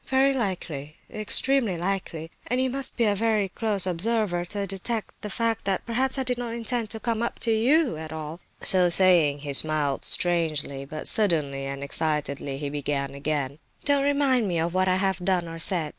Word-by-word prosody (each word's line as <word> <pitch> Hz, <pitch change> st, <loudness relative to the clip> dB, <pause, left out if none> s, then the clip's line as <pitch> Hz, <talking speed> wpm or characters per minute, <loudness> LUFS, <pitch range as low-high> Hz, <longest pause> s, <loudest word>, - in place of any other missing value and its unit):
"Very 270 Hz, +1 st, +3 dB
likely, 170 Hz, -, -4 dB, 0.2 s
extremely 215 Hz, -1 st, +2 dB
likely, 170 Hz, -3 st, -4 dB, 0.2 s
and 250 Hz, +2 st, 0 dB
you 260 Hz, 0 st, +1 dB
must 270 Hz, 0 st, -2 dB
be 235 Hz, -, +2 dB
a 210 Hz, -2 st, +3 dB
very 215 Hz, -1 st, +1 dB
close 205 Hz, -1 st, +1 dB
observer 185 Hz, 0 st, 0 dB
to 200 Hz, +3 st, -3 dB
detect 200 Hz, +4 st, -4 dB
the 210 Hz, -, -5 dB
fact 230 Hz, +2 st, -1 dB
that 195 Hz, -1 st, -1 dB
perhaps 260 Hz, +3 st, +1 dB
I 265 Hz, -, 0 dB
did 250 Hz, -1 st, -1 dB
not 235 Hz, -1 st, -4 dB
intend 235 Hz, -1 st, -1 dB
to 220 Hz, -, -3 dB
come 230 Hz, 0 st, -2 dB
up 235 Hz, -, -2 dB
to 230 Hz, -, +1 dB
you 250 Hz, -, +2 dB
at 160 Hz, 0 st, -8 dB
all." 160 Hz, +1 st, -7 dB, 0.2 s
So 180 Hz, -2 st, +4 dB
saying 170 Hz, -6 st, +4 dB
he 145 Hz, -1 st, -5 dB
smiled 150 Hz, -1 st, +1 dB
strangely; 155 Hz, -6 st, -1 dB
but 155 Hz, +2 st, -5 dB
suddenly 150 Hz, -, +4 dB
and 140 Hz, 0 st, -5 dB
excitedly 140 Hz, -2 st, -1 dB
he 140 Hz, 0 st, -4 dB
began 140 Hz, -1 st, -3 dB
again: 140 Hz, 0 st, -3 dB, 0.3 s
"Don't 285 Hz, -1 st, +2 dB
remind 280 Hz, -5 st, +2 dB
me 175 Hz, -3 st, -1 dB
of 165 Hz, +1 st, -1 dB
what 185 Hz, 0 st, +1 dB
I 185 Hz, -, +3 dB
have 190 Hz, -1 st, 0 dB
done 180 Hz, -2 st, 0 dB
or 165 Hz, 0 st, -8 dB
said. 165 Hz, -2 st, +1 dB
185 Hz, 190 wpm, -25 LUFS, 155-230 Hz, 0.3 s, So